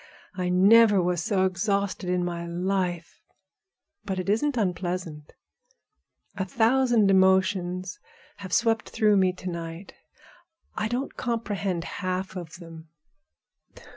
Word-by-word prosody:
I 180 -1 -2
never 205 +3 +6
was 175 -1 0
so 190 +1 +1
exhausted 200 0 -1
in 180 -1 0
my 170 -1 -4
life. 175 -1 -3 0.8
But 195 -3 -4
it 185 +1 -3
isn't 250 +6 +1
unpleasant. 180 -6 -3 1.0
A 190 - -2
thousand 230 0 +3
emotions 190 -1 +2 0.4
have 190 -3 -9
swept 225 +1 +1
through 215 -2 +3
me 185 -1 +3
to 185 0 -9
night. 170 +1 -6 0.8
I 215 - -2
don't 245 +4 -3
comprehend 205 -7 -2
half 185 +1 -4
of 175 -4 -7
them. 165 -2 -12
190 Hz, 115 wpm, -26 LUFS, 180-205 Hz, 1.0 s, never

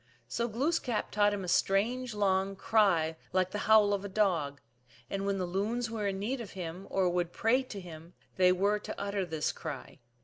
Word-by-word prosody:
So 235 - -1
Glooskap 245 0 -1
taught 205 0 +3
him 205 -2 -3
a - - -5
strange, 220 +7 +1
long 195 -1 +1
cry 185 -7 +2 0.2
like 185 0 +2
the 210 - -3
howl 210 -2 +6
of 200 -1 -1
a 200 - -5
dog, 170 -9 +1 0.5
and 195 0 -2
when 200 0 +1
the 185 - -1
loons 220 +6 -1
were 215 -3 -2
in 195 -1 -1
need 240 +6 -2
of 215 - -8
him 180 +1 -6
or 190 -1 +2
would 175 -1 0
pray 230 +7 +2
to 240 -6 -8
him 170 -1 -11 0.2
they 180 -1 +5
werej 200 +3 +1
to - - -6
utter 200 -2 -2
this 160 -2 -1
cry. 150 -5 -7
195 Hz, 200 wpm, -31 LUFS, 180-215 Hz, 0.5 s, howl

